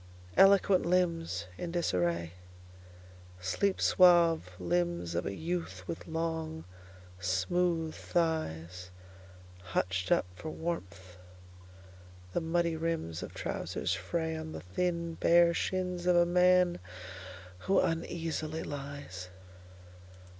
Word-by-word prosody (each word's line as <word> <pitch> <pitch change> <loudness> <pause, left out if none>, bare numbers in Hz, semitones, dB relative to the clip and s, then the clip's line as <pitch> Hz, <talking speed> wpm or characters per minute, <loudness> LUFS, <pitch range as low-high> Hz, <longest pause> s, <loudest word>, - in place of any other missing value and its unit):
Eloquent 195 -1 +6
limbsIn 165 - -1
disarraySleep 85 - 0 1.5
suave 170 - +5
limbs 85 -1 -1
of 85 - -1
a 100 - -3
youth 170 - -4
with 165 - -6
long, 160 -1 -3 0.5
smooth 160 - 0
thighsHutched 90 - -2 1.2
up - - +4
for 155 - -7
warmth; 95 - -5 1.2
the - - 0
muddy 170 0 +1
rimsOf 160 - -3
trousers - - -2
frayOn 160 -2 -3
the - - -6
thin 170 - -2
bare 170 0 +6
shins 180 0 -2
of 180 - +5
a 175 0 +6
man 180 0 +4 0.9
who 195 - +5
uneasily 165 -1 -2
lies. 140 -11 -7
165 Hz, 90 wpm, -31 LUFS, -, 1.5 s, Eloquent